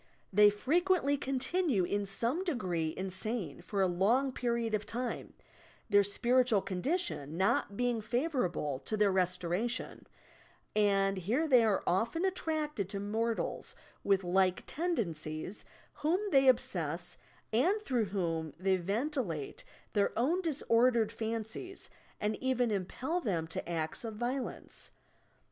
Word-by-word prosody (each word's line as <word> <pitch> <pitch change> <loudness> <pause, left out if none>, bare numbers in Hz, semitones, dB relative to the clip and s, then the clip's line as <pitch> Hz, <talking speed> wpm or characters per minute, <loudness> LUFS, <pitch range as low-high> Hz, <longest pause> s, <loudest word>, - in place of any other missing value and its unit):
They 210 +1 +8
frequently 300 - +2
continue 270 - +1
in 200 +3 -1
some 235 - 0
degree 180 - -1
insane 190 -2 -3
for 195 +2 0
a - - +4
long 220 +10 +2
period 235 -3 -1
of 215 -1 +1
time, 245 +3 -4 0.6
their 205 0 +6
spiritual 240 +1 +2
condition 185 - -2
not 195 +1 +1
being 245 -2 +1
favourable 215 - -1
to 215 - -3
thoir 205 -1 +4
restoratdon, 185 +5 -1 0.7
and 195 -2 +3
here 235 - 0
they 250 -5 +6
are 210 -3 +2
often 230 - +1
attracted 310 - -1
to 195 - -3
mortals 220 +3 0 0.3
with 195 -1 +3
like 185 +1 +2
tendencies 180 - -3 0.3
whom 310 +5 +1
they 270 -2 +5
obsess 175 - +1 0.3
and 355 - +3
through 250 - 0
whom 165 -5 -2
they 190 +1 +2
ventilate 200 - -2 0.3
their 205 -1 +1
own 310 +11 +2
dis 315 -5 -2
ordered 230 -1 +4
fancies 225 - -5 0.3
and 210 +1 -1
even 250 -3 +1
impel 250 - -2
them 175 - -1
to 165 +1 -5
acts 160 +2 -2
of 225 -2 -5
vio 245 +4 -1
lenee. - - -8
220 Hz, 130 wpm, -32 LUFS, 185-260 Hz, 0.7 s, They